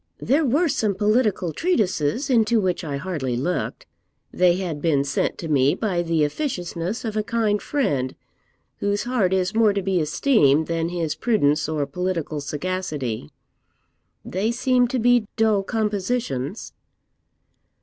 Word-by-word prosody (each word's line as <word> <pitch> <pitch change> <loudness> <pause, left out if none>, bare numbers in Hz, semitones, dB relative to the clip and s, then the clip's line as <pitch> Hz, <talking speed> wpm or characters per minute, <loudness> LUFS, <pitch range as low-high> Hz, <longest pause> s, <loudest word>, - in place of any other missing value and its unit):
'There 290 +5 +1
were 295 +8 +2
some 215 -8 0
political 210 -4 +1
treatises, 215 - 0
into 230 -3 +3
which 185 -2 -1
I 145 -3 -3
hardly 140 -7 -3
looked. 180 - -2 0.5
They 180 -1 +4
had 175 -6 -4
been 145 -4 +2
sent 140 - -1
to 165 - -6
me 140 -2 +3
by 190 -6 -1
the 165 -2 +1
officiousness 180 - -3
of 220 -1 -3
a 215 - +1
kind 215 -1 0
friend, 165 - -1 0.6
whose 205 0 -1
heart 240 -7 +1
is 190 +1 +1
more 220 -2 +4
to 200 - -1
be 190 -1 +1
esteemed 155 - +3
than 165 0 -1
his 170 -3 -2
prudence 155 -9 +1
or 150 -2 -1
political 165 -1 -3
sagacity; 145 - -3 1.0
they 200 +5 -1
seemed 250 0 +2
to 260 - -1
be 245 -2 +3
dull 220 -3 +3
compositions.' 205 - -2
185 Hz, 140 wpm, -23 LUFS, 155-225 Hz, 1.0 s, They